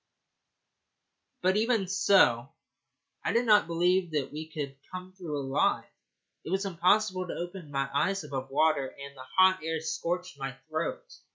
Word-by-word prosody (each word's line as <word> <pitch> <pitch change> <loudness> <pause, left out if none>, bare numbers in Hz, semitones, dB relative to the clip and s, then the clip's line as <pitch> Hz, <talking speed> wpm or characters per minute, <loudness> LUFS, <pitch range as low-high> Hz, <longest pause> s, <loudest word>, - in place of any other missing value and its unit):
But 190 +2 +3
even 220 -3 +1
so 180 -11 +4 0.7
I - - 0
did 235 +1 +2
not 210 -5 +5
believe 175 +1 +1
that 145 -3 -1
we 155 +1 -7
could 145 -3 -5 0.2
come 185 0 -8
through 170 -6 -5
alive. 135 -1 +1 0.6
It - - -7
was 190 +2 0
impossible 185 +1 +2
to - - -5
open 175 -2 -6
my 135 -1 -1
eyes 195 +6 +1
above 135 -3 -5
water, 145 -1 +2
and 140 +1 -11
the 130 -1 -11
hot 185 0 +6
air 160 0 -1
scorched 175 +1 -3
my 135 -1 -4 0.2
throat. 160 - -3
170 Hz, 155 wpm, -29 LUFS, 145-190 Hz, 0.7 s, hot